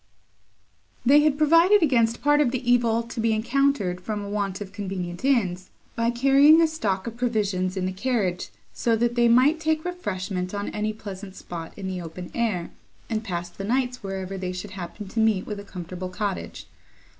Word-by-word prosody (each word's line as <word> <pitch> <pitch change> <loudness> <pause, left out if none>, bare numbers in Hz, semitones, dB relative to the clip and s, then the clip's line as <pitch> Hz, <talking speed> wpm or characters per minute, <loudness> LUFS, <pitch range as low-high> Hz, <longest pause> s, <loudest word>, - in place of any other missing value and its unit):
They 280 +4 +7
had 300 -1 +2
provided 335 +6 +5
against 235 -5 +2
part 295 +1 +4
of 280 - +3
the 255 0 -4
evil 235 -2 +3
to 230 0 -8
be 225 0 +2
encountered 230 -5 +1
from 210 +1 -4
a 200 - -6
want 200 -2 -2
of 200 -1 -8
convenient 190 -3 -5
inns, 190 -9 +1 0.3
by 230 0 +1
carrying 275 +6 +6
a 330 - +6
stock 210 -12 -2
of 235 0 -6
provisions 200 -6 0
in 185 - -1
the 185 - -1
carriage, 195 -4 -1 0.2
so 230 -1 +1
that 235 +1 +1
they 240 0 +3
might 260 +7 +5
take 315 0 0
refreshment 190 - -3
on 200 0 -3
any 215 +1 -2
pleasant 200 -2 -9
spot, 165 -2 -7
in 195 - -6
the 185 -1 -4
open 175 +1 -8
air, 210 -8 -1 0.4
and 220 0 -1
pass 175 -4 -3
the 195 - -8
nights 250 +3 -1
wherever 195 -1 -5
they 185 -1 -3
should 185 +2 -7
happen 190 +2 -7
to 225 - -4
meet 220 -4 +2
with 210 -1 -5
a - - -8
comfortable 180 -1 -7
cottage. 200 +1 -4
215 Hz, 190 wpm, -25 LUFS, 190-245 Hz, 0.4 s, They